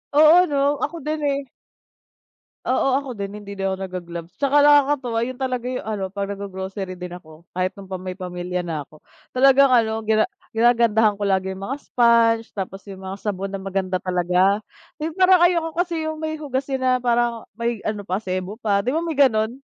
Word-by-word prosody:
Oo, 320 +4 +7
'no? 285 -1 +1
Ako 335 -5 -3
din 305 +1 -2
eh. 280 -1 -1 1.2
Oo, 260 +1 +1
ako 275 -1 -5
din, 200 -1 -6
hindi 200 -1 -9
din 195 -1 -2
ako 190 - -2
nag-ga-gloves. 175 -3 -7
'Tsaka 280 +1 +2
nakakatuwa 285 -5 +4
yun 250 +1 -3
talaga 255 -2 -2
'yung 255 - -4
ano, 210 -3 -3
'pag 200 +1 -4
nag-go-grocery 190 -1 -6
din 180 0 -7
ako, 160 -1 -13
kahit 185 +1 0
noon 195 - -9
pa 185 - -3
may 185 0 -6
pamilya 180 -1 -4
na 160 -3 -3
ako, 155 +2 -14 0.3
talagang 275 +1 +5
ano 225 -3 +2
gina 220 0 +2 0.3
ginagandahan 230 -2 +4
ko 205 - -2
lagi 190 0 0
'yung 190 - -10
mga 270 +8 -3
sponge, 230 -3 +3
tapos 195 0 -5
'yung 190 -1 -9
mga 190 +1 -5
sabon 195 -2 -3
na 195 - -4
maganda 190 -1 -2
talaga. 180 +2 +2 0.4
'Yung 315 +1 -4
parang 370 -1 +5
ayoko 335 -2 +2
kasi 340 -2 0
'yung 315 0 -4
may 315 0 -3
hugasin 270 -2 -3
na 255 - +3
parang, 240 -2 0
may 235 +1 -2
ano 210 -1 -2
pa, 190 -1 -2
sebo 185 0 -4
pa. 200 -4 +1
'Di 245 - -2
ba, 325 +4 0
may 330 - -2
gano'n? 225 -5 +3
220 Hz, 190 wpm, -22 LUFS, 190-270 Hz, 1.2 s, Oo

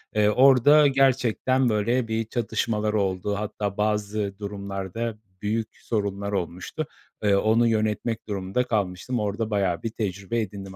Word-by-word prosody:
Iıı, 105 -1 +4
orada 135 +4 +6
gerçekten 130 -1 +2
böyle 115 +3 +1
bir 110 0 -1
çatışmalar 110 -1 -1
oldu 100 -1 0
hatta 105 -1 -3
bazı 105 -1 -1
durumlarda 100 +2 -4 0.2
büyük 110 +1 -1
sorunlar 100 -2 -2
olmuştu. 95 - -3 0.4
Iıı, 100 -1 +4
onu 115 +2 +3
yönetmek 110 +1 -1
durumunda 100 +3 -1
kalmıştım. 105 +3 -1
Orada 105 +2 -2
bayağı 95 -5 0
bir 115 - -1
tecrübe 100 0 -3
edindim 95 -2 -7
105 Hz, 130 wpm, -25 LUFS, 100-115 Hz, 0.4 s, orada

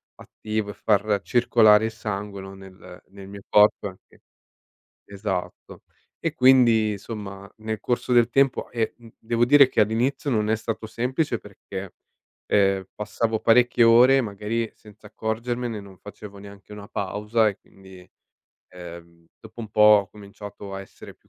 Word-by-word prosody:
attivo 110 -1 -5
e - - -6
far 105 -1 +1
circolare 110 -3 +4
il 110 - -3
sangue, 105 -2 -6
no, 95 0 -10
nel 95 -1 -14
nel 95 0 -13
mio 100 0 -10
corpo 105 0 +4
anche. 95 -1 -15 0.8
Esatto. 100 -2 -6 0.4
E - - -3
quindi, 120 -4 +4
insomma, 100 -1 -8
nel 110 -1 -5
corso 120 +3 -2
del 120 -1 +4
tempo 135 +1 +1
e, 115 -2 -2
mhmm, 115 -1 -15
devo 115 +1 0
dire 140 0 +6
che 115 - 0
all'inizio 115 +7 0
non 110 -4 0
è 110 - +2
stato 110 0 -5
semplice 125 +3 -2
perché, 100 -2 -10 0.5
ehm, 95 -1 +1
passavo 110 +1 -2
parecchie 120 +1 +4
ore 125 +4 +6
magari 110 +1 -4
senza 105 0 -17
accorgermene, 115 +1 -4
non 95 -2 -15
facevo 105 +1 -12
neanche 100 0 -14
una 105 -1 -10
pausa 105 +3 0
e 100 - -8
quindi, 95 -2 -17 0.6
ehm, 85 -1 -12
dopo - - -12
un 110 - -7
po' 105 - -2
ho 105 -2 +6
cominciato 100 -1 -11
a 95 - -5
essere 95 - -13
più - - -35
105 Hz, 150 wpm, -23 LUFS, 100-115 Hz, 0.8 s, dire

